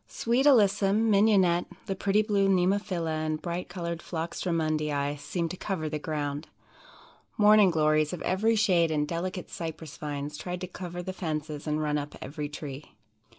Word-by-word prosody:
"Sweet 245 +5 +1
Alyssum, 210 -3 +4
Mignonnette, 195 -4 +4 0.2
the 195 - -2
pretty 200 +2 +2
blue 200 -2 +2
Nemophila 180 -4 +1
and 155 0 -1
bright 175 +2 -4
colored 170 -2 -4
Phlox 165 -1 -4
Drummondii 155 -4 0
seemed 170 +2 -3
to 185 - -6
cover 175 -7 -3
the 150 0 -3
ground. 145 -1 -3 0.9
Morning 210 -1 +7
Glories 155 -2 +2
of 180 - -5
every 220 +5 +2
shade 180 -6 +3
and 150 -1 0
delicate 180 +2 -4
Cypress 160 -3 -6
vines 145 0 -5
tried 180 0 -5
to 185 - -3
cover 175 -1 -6
the 185 - -4
fences 155 -4 -4
and 150 0 0
run 150 0 0
up 145 0 -7
every 145 +2 -5
tree. 145 -1 -8
170 Hz, 160 wpm, -28 LUFS, 155-195 Hz, 0.9 s, Morning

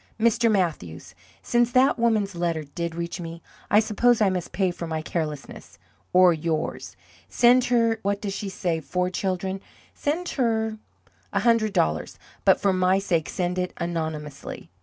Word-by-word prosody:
"Mr. 230 0 +3
Mathews, 95 - -2 0.3
since 240 0 +2
that 255 0 +4
woman's 215 -4 +1
letter 170 -2 -1
did 165 +3 -5
reach 170 +1 -4
me, 165 0 -7 0.3
I 210 - +6
suppose 225 +2 +2
I 205 -3 +3
must 180 -2 -3
pay 190 -1 +1
for 175 -1 -6
my 160 -1 -3
carelessness 155 -4 -5 0.3
or 180 -1 +6
yours. 160 -1 -3 0.3
Send 245 +1 +5
her 230 -2 +2
what 200 +1 -1
does 200 -2 -4
she 200 0 -4
say 175 -3 -2
four 180 +4 -2
children? 190 +1 -2 0.3
send 330 +5 -2
her 220 -4 0 0.5
a - - 0
hundred 230 -3 +3
dollars. 80 0 0 0.3
But, - - +5
for 200 -1 +2
my 185 +1 +3
sake, 175 -5 0
send 180 0 -2
it 180 0 -2
anonymously. 160 -4 -5
185 Hz, 160 wpm, -25 LUFS, 170-220 Hz, 0.5 s, I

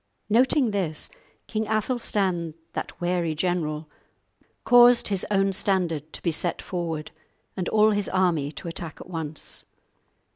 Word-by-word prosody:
Noting 250 +2 +4
this, 175 -7 -2 0.3
King 220 -1 -2
Athelstan, 205 -7 0 0.2
that - - -5
wary 175 -2 0
general, 155 -3 -1 0.8
caused 245 -1 +7
his 195 -2 -1
own 195 -1 +2
standard 175 -6 0
to - - -8
be 170 - +2
set 170 +2 -1
forward 165 -4 -4 0.4
and 185 -2 -2
all 215 0 +5
his 205 -1 0
army 170 -6 +1
to - - -8
attack 165 -1 -6
at - - -10
once. 160 -3 -3
180 Hz, 135 wpm, -25 LUFS, 160-210 Hz, 0.8 s, caused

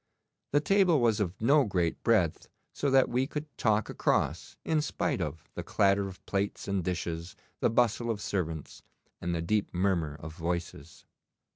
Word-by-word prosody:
The 145 - +3
table 185 -2 +4
was 115 -3 +2
of 95 -3 -2
no 140 +6 +5
great 90 -7 -1
breadth, 100 -9 +2 0.2
so 145 - 0
that 135 0 +5
we 130 +2 0
could 150 0 -6
talk 110 -2 +1
across - - 0
in 155 -1 +2
spite - - -1
of 80 - -4
the - - -4
clatter 100 0 +2
of 95 -1 -11
plates 100 0 -2
and 100 -2 0
dishes, 85 -1 -3 0.2
the - - +3
bustle 120 0 +2
of 110 -3 -1
servants, 80 -7 -3 0.4
and 85 0 -1
the 80 - -2
deep 105 +4 0
murmur 90 -5 +1
of 80 +1 -8
voices. 85 -3 -5
100 Hz, 165 wpm, -30 LUFS, 85-120 Hz, 0.4 s, no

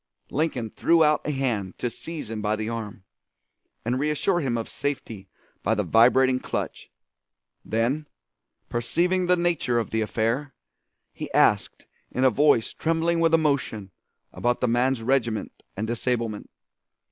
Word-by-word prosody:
Lincoln 130 -7 -1
threw 165 -1 +3
out 150 0 +3
a - - -1
hand 120 -9 -2
to - - -2
seize 150 0 -6
him 110 -1 -4
by 105 0 +1
the 110 0 -4
arm, 110 -4 -5 0.8
and 125 +3 0
reassure 150 +5 +1
him 130 -7 -1
of 115 - -3
safety 115 -8 -4 0.3
by 110 - +1
the 105 - 0
vibrating 125 +6 +4
clutch. - - -4 0.7
Then, 125 +7 -1 0.6
perceiving 175 +10 0
the 180 - +5
nature 170 -8 +1
of 115 - -1
the 110 - 0
affair, 115 +6 -1 0.6
he - - -7
asked - - +2 0.2
in 125 - -1
a 130 - +6
voice 140 -2 +3
trembling 165 +1 0
with 165 0 +4
emotion 140 -10 0 0.4
about 120 0 0
the 125 - +1
man's 120 +1 +1
regiment 115 -4 -1 0.2
and 110 - -1
disablement. 115 -2 -2
125 Hz, 145 wpm, -25 LUFS, 115-150 Hz, 0.8 s, a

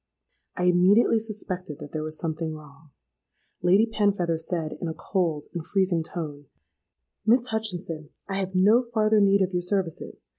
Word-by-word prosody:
I 180 - -1
immediately 185 +6 +4
suspected 190 -8 -5
that 145 - -10
there 155 - -3
was 155 0 -5
something 160 -1 -3
wrong. 150 0 -15 0.7
Lady 190 +5 +5
Penfeather 200 -7 0
said, 160 -1 -3
in 175 - -2
a 160 - -4
cold 165 -6 -1
and 170 -3 -4
freezing 185 -2 +1
tone, 150 -4 -6 0.8
'Miss 240 +3 +3
Hutchinson, 175 -8 -3 0.2
I 195 - -3
have 190 -1 -3
no 210 +6 +5
farther 215 -2 +3
need 200 0 +4
of 185 0 -2
your 180 - +1
services. 180 - -3
180 Hz, 155 wpm, -26 LUFS, 160-200 Hz, 0.8 s, Lady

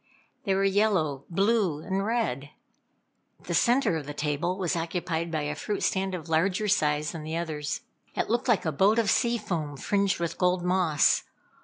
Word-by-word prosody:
They 195 -2 +2
were 195 - +1
yellow, 190 -9 +1
blue 195 -4 +1
and 195 +1 -1
red. 205 - -1 0.9
The - - -5
centre 245 -6 +3
of 145 -3 -7
the 145 - -6
table 150 +5 -1
was 185 -2 -1
occupied 170 0 -2
by 155 -2 -1
a 150 +1 -2
fruit 205 +7 -3
stand 190 0 0
of 170 -2 -7
larger 180 +6 +1
size 150 -6 +1
than 165 - -7
the 160 +2 -4
others. 155 -3 -3 0.3
It - - 0
looked 240 +3 0
like 230 -7 +2
a 160 - +1
boat 195 +9 +3
of 225 -3 +3
sea 235 -1 +2
foam 165 -9 -4
fringed 200 +3 0
with 170 -1 -3
gold 180 -1 +2
moss. 180 -4 +3
180 Hz, 180 wpm, -27 LUFS, 155-200 Hz, 0.9 s, centre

